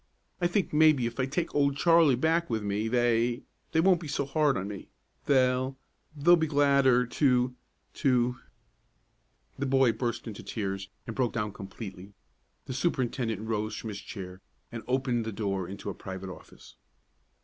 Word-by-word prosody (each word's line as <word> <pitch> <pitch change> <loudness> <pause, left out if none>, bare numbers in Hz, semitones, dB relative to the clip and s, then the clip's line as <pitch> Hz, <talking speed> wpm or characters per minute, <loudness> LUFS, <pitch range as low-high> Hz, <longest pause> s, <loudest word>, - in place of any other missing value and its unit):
I 175 - +4
think 180 0 -1
maybe 150 -5 +5
if 120 +2 -4
I 130 - +1
take 165 +5 -2
Old 140 -1 +2
Charlie 165 -4 +5
back 165 +6 +1
with 110 -2 -1
me 105 +2 -1
they 120 +1 +1 0.3
they 160 - +2
won't 180 0 +4
be 160 - -6
so 140 -1 -1
hard 145 -1 +2
on 95 +1 -3
me; 100 -1 -8 0.4
they 130 -1 +2 0.4
they'll 165 +5 +6
be 160 -2 0
gladder 140 -4 +4
to 125 -1 +2 0.4
to 125 -2 +2 0.6
" - - -31
The 140 - 0
boy 135 -2 +4
burst 120 0 -3
into 110 -3 -7
tears, 100 -2 -4 0.2
and 115 - -6
broke 125 -3 0
down 105 -3 -2
completely. 95 0 -9 0.5
The - - -5
superintendent 125 - -1
rose 110 -1 -2
from 110 - -6
his 100 -1 -6
chair, 95 -3 -8 0.3
and 115 -1 -6
opened 125 -2 0
the 110 - -4
door 95 -3 -2
into 100 +1 -6
a - - -6
private 95 +1 -7
office. - - -14
125 Hz, 170 wpm, -29 LUFS, 110-140 Hz, 0.6 s, they'll